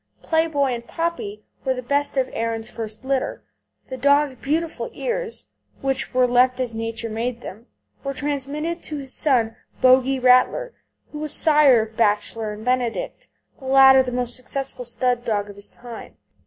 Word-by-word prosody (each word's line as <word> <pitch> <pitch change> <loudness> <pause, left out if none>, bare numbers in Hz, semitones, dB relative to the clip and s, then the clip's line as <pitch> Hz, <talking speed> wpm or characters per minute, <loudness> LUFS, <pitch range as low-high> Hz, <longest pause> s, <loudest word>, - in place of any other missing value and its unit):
Play 320 0 +2
Boy 280 -5 0
and 235 0 -7
Poppy 330 -12 -4 0.2
were 260 -1 0
the 250 - -6
best 285 +3 -1
of 260 -1 +2
Erin's 225 -1 -3
first 220 +1 -5
litter. 265 -1 -2 0.5
The 260 - -5
dog's 285 +1 +3
beautiful 325 - -2
ears, - - -4 0.4
which 270 0 -2
were 255 0 +3
left 250 +1 +3
as 250 -3 -2
Nature 225 0 -4
made 235 +2 -3
them, 225 +4 -10 0.4
were 275 0 -4
transmitted 295 +4 -3
to 305 - -5
his 270 -2 -7
son 235 -6 +1 0.2
Bogie 260 +1 +4
Rattler, 255 - +3 0.4
who 300 - -7
was 305 -1 +4
sire 295 -7 +6
of 220 0 -11
Bachelor 215 0 0
and 210 +2 -9
Benedict, 255 - -2 0.3
the 270 - -12
latter 265 0 +7
the 255 -1 -3
most 245 -1 -1
successful 260 0 -5
stud 245 0 -1
dog 205 -3 -2
of - - -15
his 200 0 -9
time. 235 -2 -11
255 Hz, 170 wpm, -22 LUFS, 235-285 Hz, 0.5 s, latter